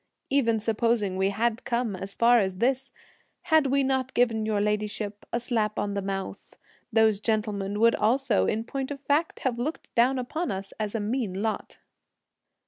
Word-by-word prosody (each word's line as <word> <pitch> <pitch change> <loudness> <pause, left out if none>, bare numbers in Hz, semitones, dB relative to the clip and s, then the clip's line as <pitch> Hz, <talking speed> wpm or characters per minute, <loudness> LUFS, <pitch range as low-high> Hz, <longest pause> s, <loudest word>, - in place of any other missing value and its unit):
Even 235 -5 +3
supposing 220 -2 0
we 190 +1 +1
had 225 +3 -1
come 235 -4 -1
as 195 +2 -6
far 235 +1 +5
as 190 -3 -1
this, 260 +5 0 0.5
had 315 -4 +4
we 275 +1 +2
not 265 -1 -1
given 225 -3 +2
your 215 -2 +1
ladyship 210 0 -2
a 235 - 0
slap 225 -3 -1
on 205 -1 -1
the 200 - -1
mouth, 195 -1 -5 0.3
those 220 -2 +4
gentlemen 210 -2 -1
would 230 +1 +5
also, 235 +1 +2
in 220 - 0
point 265 +2 -4
of 285 -1 -5
fact, 290 +4 0
have 245 -3 -1
looked 300 +7 -4
down 250 +3 +3
upon 310 +7 -3
us 195 -1 -4
as 215 0 -2
a - - 0
mean 210 -3 -2
lot." 220 -1 -3
225 Hz, 175 wpm, -27 LUFS, 205-255 Hz, 0.5 s, far